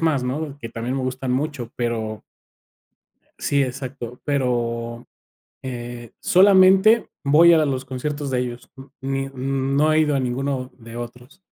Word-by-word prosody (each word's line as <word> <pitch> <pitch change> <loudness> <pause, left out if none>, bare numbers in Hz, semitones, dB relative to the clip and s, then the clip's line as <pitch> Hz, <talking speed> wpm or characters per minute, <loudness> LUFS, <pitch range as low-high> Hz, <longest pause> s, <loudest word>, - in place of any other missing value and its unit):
más, 155 -5 +2
¿no?, 140 +3 -3
que 115 - -6
también 115 +3 -4
me 135 - -2
gustan 130 0 -2
mucho, 135 -3 -2
pero 110 -3 -3 1.2
Sí, 140 -1 +1
exacto, 125 -2 -5
pero, 120 -4 -1 0.6
eh, 120 -2 -7
solamente 195 +3 +6
voy 155 +5 +6
a 160 -2 +4
los 135 -2 -2
conciertos 140 +2 -4
de 125 - 0
ellos, 120 -1 -5
mm 135 0 -11 0.2
ni 135 0 -2
mm, 135 0 -2
no 155 +2 +4
he 155 - +4
ido 150 -2 +2
a - - +2
ninguno 130 +1 -2
de 115 -1 -11
otros. 125 +6 -9
130 Hz, 150 wpm, -22 LUFS, 120-145 Hz, 1.2 s, solamente